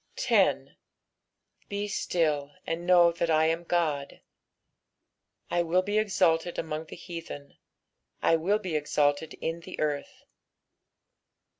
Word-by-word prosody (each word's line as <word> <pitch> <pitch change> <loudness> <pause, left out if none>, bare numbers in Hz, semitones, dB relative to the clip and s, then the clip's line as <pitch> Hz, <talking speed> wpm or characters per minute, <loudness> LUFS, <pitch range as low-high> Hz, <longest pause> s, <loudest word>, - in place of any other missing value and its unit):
10 - - +1 0.9
Be 205 0 -2
still, 150 -7 -1
and 170 +1 -3
know 175 -2 +6
that 170 0 -2
I 160 0 +4
am 165 +1 0
God: 155 -5 -1 1.3
I 175 - +2
will 175 +2 +2
be 205 +2 +1
exalted 175 -5 +1
among 160 0 -3
the - - -10
heathen, 165 -4 -9 0.6
I 165 - +3
will 180 +6 +1
be 185 -7 -4
exalted 150 +1 0
in 165 +1 -3
the 170 - -10
earth. 145 -2 -3
165 Hz, 120 wpm, -28 LUFS, 155-175 Hz, 1.3 s, know